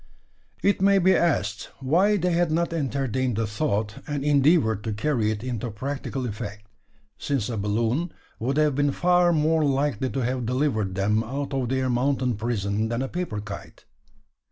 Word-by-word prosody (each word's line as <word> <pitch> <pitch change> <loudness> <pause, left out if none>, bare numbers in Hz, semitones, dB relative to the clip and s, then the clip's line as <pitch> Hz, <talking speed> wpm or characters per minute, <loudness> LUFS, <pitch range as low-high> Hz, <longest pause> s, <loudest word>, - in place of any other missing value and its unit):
It 200 -1 +2
may 200 0 +5
be 190 0 +4
asked 105 - 0
why 180 +10 +3
they 180 -1 0
had 170 -1 +2
not 170 +1 0
entertained 130 -5 -1
the 115 +1 0
thought, 105 -2 -1
and 145 -2 -2
endeavoured 140 - +3
to 110 - -1
carry 110 0 0
it 110 0 -3
into 120 -2 -3
practical 135 +3 -4
effect: 105 -2 -6 0.5
since 135 -6 -1
a 115 - -2
balloon 115 - 0 0.3
would 135 +5 -1
have 150 -2 +3
been 145 +1 +1
far 180 0 +3
more 160 0 +2
likely 135 -3 0
to 135 - -2
have 125 -1 -1
delivered 120 -7 0
them 105 +3 +1
out 140 +4 -4
of 130 -3 -1
their 130 0 0
"mountain 125 0 +1
prison" 110 -1 -1
than 120 +2 -1
a - - -2
paper 170 -10 -3
kite? 105 -1 -9
130 Hz, 170 wpm, -25 LUFS, 110-150 Hz, 0.5 s, may